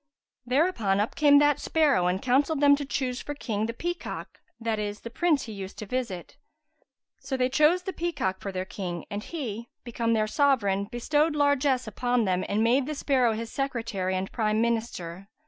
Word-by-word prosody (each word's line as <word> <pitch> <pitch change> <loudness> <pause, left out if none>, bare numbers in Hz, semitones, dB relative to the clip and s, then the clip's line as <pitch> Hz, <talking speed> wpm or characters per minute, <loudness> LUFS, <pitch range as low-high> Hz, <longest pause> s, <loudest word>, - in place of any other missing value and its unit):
Thereupon 250 - +2
up 210 - 0
came 290 -3 +6
that 290 0 +4
sparrow 290 - +2
and 180 +1 +1
counselled 275 +4 +2
them 285 0 +6
to 285 0 -4
choose 255 -2 -2
for 290 - -6
King 220 -6 -2
the 230 - -3
peacock 345 +6 -5 0.2
(that 225 -2 -1
is, 205 0 -4
the 235 - -8
prince 310 +1 +2
he 225 - -7
used 195 -1 -7
to 215 - -6
visit). 235 -1 -4 0.8
So 270 0 -3
they 255 0 +2
chose 305 +7 +3
the 380 - -4
peacock 290 - -2
to 195 - -5
their 185 0 -3
King 180 -3 -5
and 205 0 -3
he, 235 -8 -5
become 230 -1 -1
their 215 -1 +2
sovereign, 215 -7 +2
bestowed 295 +8 0
largesse 285 -3 +2
upon 245 +1 0
them 185 -1 +1
and 210 +2 +1
made 255 +4 +3
the 305 - -3
sparrow 260 -5 +2
his 225 +1 -5
secretary 230 -9 -2
and 185 +1 -3
Prime 215 -2 0
Minister. 220 -6 -2
240 Hz, 185 wpm, -27 LUFS, 205-285 Hz, 0.8 s, came